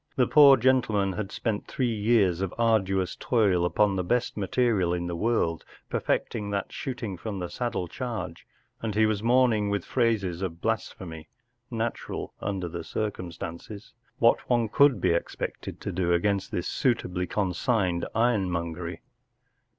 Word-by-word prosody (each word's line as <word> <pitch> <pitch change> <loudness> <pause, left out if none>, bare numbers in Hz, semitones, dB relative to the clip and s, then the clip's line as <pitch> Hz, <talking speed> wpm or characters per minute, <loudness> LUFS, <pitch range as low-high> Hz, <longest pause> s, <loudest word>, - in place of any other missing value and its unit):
The 125 - +4
poor 140 0 +8
gentleman 110 -6 +2
had 105 0 -4
spent 110 -3 -2
three 125 -3 -1
years 105 -5 +2
of 95 -2 -3
ardu¬ 110 -5 +2
ous 90 - -7
toil 100 -8 +2
upon 100 +3 +2
the 90 - 0
best 120 +6 0
material 105 -3 +1
in 85 0 -3
the 85 0 -3
world 85 -4 0 0.3
perfecting 105 -1 -1
that 100 -1 -2
shooting 120 -8 -4
from 100 +3 -5
the 90 -2 -4
saddle 120 -7 -2
charge, 120 +5 -5 0.3
and 110 -3 -3
he 110 0 +4
was 110 -2 0
inquiring 115 -3 +3
with 100 -3 -1
phrases 105 -8 0
of 85 -3 -4
blasphemy, 90 -6 -4 0.4
natural 115 -1 -4
under 95 -3 -2
the 85 0 -6
circumstances, 90 +1 -5 0.2
what 115 0 +3
one 120 -3 +2
could 140 -2 +4
be - - +2
expected 85 - -3
to - - -3
do 85 -1 0
against 100 +2 +1
this 90 - -3
suitably 90 -8 0
consigned 95 -2 0
ironmongery. 90 -7 0
100 Hz, 150 wpm, -27 LUFS, 90-115 Hz, 0.4 s, poor